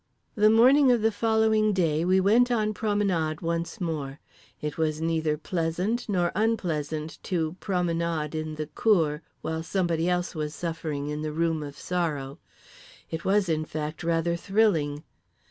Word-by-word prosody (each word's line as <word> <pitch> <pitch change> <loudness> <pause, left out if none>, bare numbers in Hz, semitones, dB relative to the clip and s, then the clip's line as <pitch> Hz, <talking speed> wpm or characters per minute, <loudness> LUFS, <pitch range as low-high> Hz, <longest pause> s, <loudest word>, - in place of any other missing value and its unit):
The 215 -1 +4
morning 255 +5 +6
of 235 -3 +2
the 225 - +4
following 220 0 +2
day 165 -4 +1
we 185 +2 +3
went 225 +6 +4
on 215 -3 +1
promenade 200 -8 0
once 170 +3 -2
more. 150 -6 -3 0.4
It 150 -1 -4
was 155 -1 -1
neither 160 -2 0
pleasant 180 +8 -2
nor 175 -3 +1
unpleasant 160 -8 -1
to 165 -3 -2
promenade 170 -5 -1
in 155 -1 -4
the 155 0 -3
cour 155 -2 +1 0.2
while 160 0 -2
somebody 170 -1 0
else 180 0 -1
was 150 -2 -4
suffering 160 -4 -3
in 150 0 -3
the 155 0 -3
Room 165 0 0
of 145 -1 -7
Sorrow. 150 -5 -3 0.7
It 160 0 -4
was, 200 0 +3
in 155 -2 0
fact, 155 +1 -5
rather 170 0 +1
thrilling. 170 -7 +1
165 Hz, 150 wpm, -27 LUFS, 155-200 Hz, 0.7 s, morning